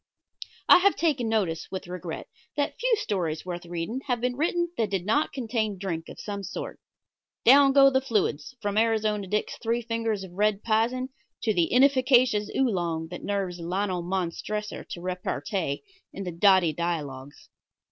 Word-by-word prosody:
I - - +9
have 400 +2 +4
taken 275 -9 0
notice 190 -8 0
with 190 -1 -5
regret, 175 -2 -6 0.3
that 285 - -1
few - - +3
stories 180 - -2
worth 175 -1 -6
reading 175 +9 -4
have 245 -2 0
been 250 +1 -1
written 345 +4 0
that 225 -3 0
did 190 -2 -2
not 285 +9 +1
contain 225 -5 -2
drink 175 -4 -4
of - - -10
some 200 -1 -5
sort. 190 - -6 0.7
Down 275 +2 +7
go 275 0 +7
the 265 0 +2
fluids, 210 - -1
from 205 +1 +1
Arizona 215 -3 +1
Dick's 210 +3 -2
three 235 +1 0
fingers 225 -3 -2
of 190 - -9
red 205 +2 +1
pizen 235 +4 +1 0.3
to 220 - +2
the 170 -4 +1
inefficacious 255 -4 +4
Oolong 175 -10 0
that 175 - -8
nerves 195 -3 -2
Lionel 180 +2 -1
Montressor 190 +4 -3
to 175 - -8
repartee 180 -3 -3 0.3
in 195 - -6
the 180 - -4
"Dotty 180 -1 +4
Dialogues." 145 -5 -4
205 Hz, 160 wpm, -26 LUFS, 175-240 Hz, 0.7 s, I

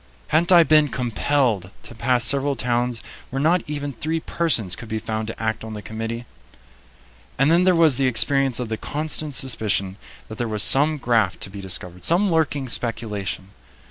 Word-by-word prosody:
Hadn't 170 +3 +2
I 175 -2 +8
been 155 -2 +4
compelled 120 -5 -1
to - - -10
pass 120 +1 +3
several 140 +2 +4
towns 120 -2 -2 0.3
where 135 - -4
not 165 +5 +2
even 145 -1 -4
three 160 +7 -3
persons 130 - -1
could 115 - -11
be 110 - -2
found 110 0 -4
to 115 - -7
act 110 0 -3
on 110 -1 -7
the 105 - -8
committee? 115 +2 -6 1.1
And 135 +4 +3
then 175 +2 +3
there 185 -1 +4
was 160 -6 +4
the 135 -1 +2
experience 135 +1 +2
of 120 -3 -4
the 110 - -3
constant 150 +1 -3
suspicion 105 -7 -1 0.3
that 110 - -10
there 120 - -1
was 105 -2 +1
some 150 +3 +4
graft 115 -8 0
to 100 - -6
be 100 0 -8
discovered, 90 -1 -6
some 185 - +3
lurking 150 -4 0
speculation. 105 -5 -2
125 Hz, 180 wpm, -22 LUFS, 110-145 Hz, 1.1 s, I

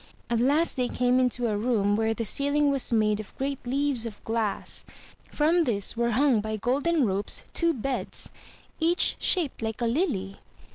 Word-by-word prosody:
At 235 - +2
last 290 +6 +2
they 250 -1 +1
came 250 +1 +1
into 250 -1 0
a 215 -2 0
room 205 -2 +1
where 225 +1 0
the 230 - -3
ceiling 285 +5 +2
was 275 -3 +1
made 215 -2 +2
of 215 - -10
great 275 0 -3
leaves 270 -2 0
of 210 -2 -11
glass; 220 -3 -3 0.5
from 320 +4 +2
this 205 -5 0
were 235 0 +1
hung 265 -6 +3
by 215 0 -3
golden 280 +6 +1
ropes 195 0 -2
two 335 -1 +2
beds, 265 -2 -4 0.5
each 340 +2 +3
shaped 330 -11 +1
like 220 -1 -3
a 240 - 0
lily. 230 - -1
245 Hz, 175 wpm, -26 LUFS, 220-285 Hz, 0.5 s, hung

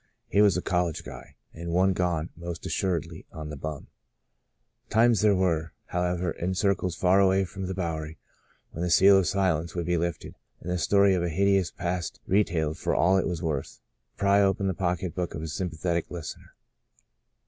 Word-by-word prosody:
He 100 - +3
was 100 -3 +4
a 90 - -2
"college 90 -4 -1
guy," - - -11 0.2
and 85 +1 -7
one 95 +3 +3
gone, 85 -3 -1
most 85 0 -7
assuredly, 85 -3 -2
"on 75 -1 -7
the - - -5
bum.'* 75 0 -6 1.0
Times 115 -1 +4
there 105 -2 +4
were, 85 -4 0 0.2
however, 90 -1 -1
in 90 +3 -3
circles 95 -3 0
far 90 +2 +3
away 95 0 +3
from 95 +1 -6
the 95 - -4
Bowery, 80 -3 -4 0.5
when 80 - -6
the 90 - 0
seal 95 +3 +6
of 90 - 0
silence 85 -3 0
would 85 -1 -2
be 90 0 +1
lifted, 85 -4 -3 0.3
and 90 - -5
the 90 - -1
story 100 +2 +4
of 90 - +1
a 85 - -1
hideous 95 +1 +2
past 85 -2 -4
re 100 +3 +3
tailed 80 -4 -2
for - - -1
all 95 +3 +4
it - - -1
was 90 -2 -3
worth, 75 -4 -3 0.4
to - - -44
pry 100 0 +4
open 100 0 +1
the 95 - +1
pocketbook 90 0 -2
of 80 - -5
a - - -4
sympathetic 85 +1 -2
listener. 85 -4 -8
90 Hz, 190 wpm, -27 LUFS, 80-95 Hz, 1.0 s, seal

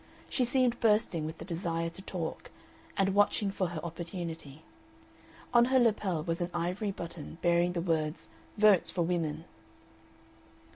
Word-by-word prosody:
She 255 - +2
seemed 245 -1 +2
bursting 210 -8 +2
with 160 +1 -6
the - - -8
desire 165 -1 -2
to 190 - -9
talk, 175 -4 -5 0.5
and 195 0 +2
watching 205 0 +3
for 190 -2 -1
her 170 -1 -5
opportunity. 165 -3 -6 0.9
On 240 0 +7
her 260 +1 +3
lapel 205 -9 +2
was 165 +1 -2
an 175 - -1
ivory 180 +5 -1
button, 170 -4 -6
bearing 175 0 +3
the 170 - -1
words 160 -2 -1 0.3
"Votes 210 -4 +5
for 175 - 0
Women." 165 -2 -1
175 Hz, 145 wpm, -31 LUFS, 165-200 Hz, 0.9 s, On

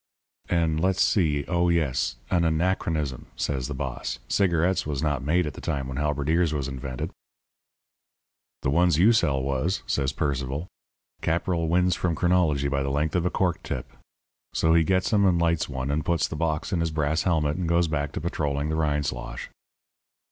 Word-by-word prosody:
"'An' 80 -3 +1
let's 95 +3 +2
see 75 -8 +2
oh, 85 -1 +2
yes 75 -7 +1 0.2
'An 85 -2 +3
anachronism,' 80 -4 0
says 65 -3 -2
the 70 - -5
boss. 65 -2 -4
'Cigarettes 90 -1 +2
was 75 -1 -2
not 75 -3 0
made 85 +5 +2
at 75 - -4
the - - -10
time 70 -2 -2
when 65 0 -5
halberdiers 75 +3 +1
was 70 -2 -2
invented.' 65 -2 -5 1.5
"'The 65 - +1
ones 85 0 +3
you 105 +8 +6
sell 70 - +2
was,' 70 +8 -1
says 70 -2 0
Sir 70 - -7
Percival. 70 0 -2 0.6
'Caporal 85 0 0
wins 90 +2 +3
from 85 -3 -1
chronology 80 -6 +2
by 70 -1 0
the 70 - -1
length 75 +3 0
of 90 0 +2
a - - +1
cork 90 -2 0
tip.' - - -5 0.6
So 80 0 +3
he 85 0 +5
gets 95 +4 +1
'em 100 -1 +4
and 90 -3 +3
lights 85 -2 +1
one, 65 0 -3
and 75 +1 0
puts 85 -1 +1
the - - -6
box 80 +2 -1
in 90 - +1
his 85 0 0
brass 75 0 0
helmet, 75 -4 +1
and 90 -3 -2
goes 85 0 +3
back 75 -2 -2
to - - -4
patrolling 75 -3 -1
the 80 - -1
Rindslosh. 75 -6 -2
80 Hz, 185 wpm, -26 LUFS, 70-85 Hz, 1.5 s, you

